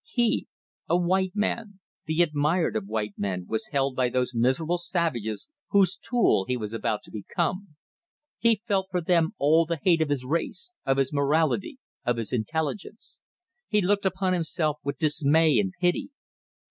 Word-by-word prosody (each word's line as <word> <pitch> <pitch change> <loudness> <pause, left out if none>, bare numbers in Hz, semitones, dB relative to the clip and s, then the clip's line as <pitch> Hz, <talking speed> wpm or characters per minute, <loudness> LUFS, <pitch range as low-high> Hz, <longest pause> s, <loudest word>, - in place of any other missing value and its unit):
He 240 -7 0 0.4
a 170 - +4
white 185 +2 +1
man, 210 -1 -2 0.3
the 160 +2 +3
admired 155 +2 +1
of 105 -2 -2
white 105 -1 -2
men, 95 -3 -2
was 110 - -2
held 135 -2 0
by 125 -1 +2
those 125 0 -1
miserable 130 +9 +1
savages 130 - -2 0.2
whose 195 -3 +3
tool 235 - +2
he 125 - 0
was 105 -2 -5
about 110 -1 -2
to - - -16
become. 170 - -3 0.6
He 230 -2 +2
felt 195 -3 +1
for 180 -1 0
them 165 -1 +1
all 160 +3 +4
the 170 0 -1
hate 170 0 +3
of 155 - +1
his 135 -3 -1
race, 170 - -2 0.2
of 135 - +3
his 135 +1 +1
morality, 155 - +1 0.3
of 120 -1 0
his 115 0 -3
intelligence. 160 - -4 0.5
He 210 - +2
looked 200 +1 +2
upon 190 0 0
himself 160 -3 -1
with 140 - -3
dismay 155 -2 +3
and 95 -2 0
pity. 175 -1 +1
160 Hz, 165 wpm, -26 LUFS, 130-185 Hz, 0.6 s, a